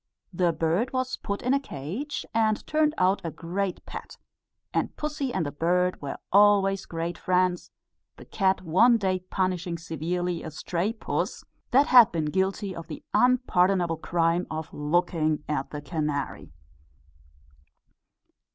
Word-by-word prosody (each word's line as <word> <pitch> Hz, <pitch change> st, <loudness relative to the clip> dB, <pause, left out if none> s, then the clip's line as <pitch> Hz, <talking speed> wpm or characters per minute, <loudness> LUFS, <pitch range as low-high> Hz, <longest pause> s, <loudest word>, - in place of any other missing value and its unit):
The 175 Hz, -1 st, +2 dB
bird 170 Hz, +11 st, 0 dB
was 255 Hz, 0 st, -1 dB
put 200 Hz, 0 st, -4 dB
in 250 Hz, +2 st, +2 dB
a 280 Hz, -, +3 dB
cage, 235 Hz, -, -5 dB
and 220 Hz, -1 st, +1 dB
turned 305 Hz, 0 st, +1 dB
out 185 Hz, +2 st, +2 dB
a 165 Hz, -, -2 dB
great 180 Hz, +4 st, -4 dB
pet; -, -, -9 dB, 0.6 s
and -, -, -1 dB
pussy 295 Hz, -3 st, -2 dB
and 185 Hz, -8 st, -1 dB
the 145 Hz, -, -3 dB
bird 180 Hz, +4 st, 0 dB
were 140 Hz, -1 st, -5 dB, 0.2 s
always 200 Hz, -1 st, +4 dB
great 165 Hz, 0 st, -4 dB
friends; 180 Hz, -1 st, +1 dB, 0.5 s
the -, -, -12 dB
cat 190 Hz, -2 st, 0 dB
one 225 Hz, +9 st, +5 dB
day 190 Hz, -3 st, 0 dB
punishing 185 Hz, -2 st, -2 dB
severely 170 Hz, +2 st, -3 dB
a -, -, -6 dB
stray 175 Hz, +5 st, -2 dB
puss 225 Hz, -, -3 dB, 0.3 s
that 270 Hz, +3 st, +5 dB
had 245 Hz, -5 st, +7 dB
been 160 Hz, -3 st, -1 dB
guilty 190 Hz, +1 st, -1 dB
of 165 Hz, -, -8 dB
the 155 Hz, -, -8 dB
unpardonable 190 Hz, -9 st, +3 dB
crime 170 Hz, +1 st, 0 dB
of 155 Hz, 0 st, -5 dB
looking 155 Hz, 0 st, 0 dB
at 150 Hz, -3 st, -2 dB
the 150 Hz, -1 st, -7 dB
canary. 150 Hz, -, -3 dB
180 Hz, 140 wpm, -26 LUFS, 165-205 Hz, 0.6 s, had